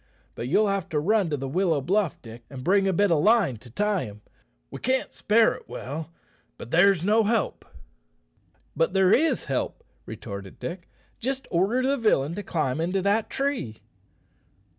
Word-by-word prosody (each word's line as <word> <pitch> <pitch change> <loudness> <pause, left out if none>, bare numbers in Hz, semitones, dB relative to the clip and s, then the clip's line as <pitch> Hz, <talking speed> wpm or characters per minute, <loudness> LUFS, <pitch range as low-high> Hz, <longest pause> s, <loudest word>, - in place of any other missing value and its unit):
But 120 - -5
you'll 210 +10 +3
have 195 -2 -2
to 155 -3 0
run 200 +3 +2
to 145 - -1
the 135 0 -4
willow 165 +1 +1
bluff, 185 +4 0
Dick, 115 0 -11
and 130 -2 -8
bring 195 +3 +3
a - - +3
bit 200 +1 +2
of 155 -3 +3
line 210 - +3
to 120 - -14
tie 205 - 0
him. 105 0 -11 0.5
We - - -7
can't 260 +1 -1
spare 220 +1 +3
it - - -13
well; 155 +5 -6 0.5
but 120 - -10
there's 180 0 +4
no 220 +2 +4
help." 220 +1 0 1.1
"But 165 +2 +1
there 190 0 +4
is 310 -2 +2
help," 135 -2 -3 0.2
retorted 100 -1 -8
Dick. 175 0 -7 0.3
"Just 265 +2 -3
order 195 +9 +2
the 280 +1 +1
villain 170 - +2
to 205 - -4
climb 155 -6 -1
into 180 +3 -1
that 205 +2 +1
tree." 265 - -2
185 Hz, 175 wpm, -25 LUFS, 145-210 Hz, 1.1 s, there's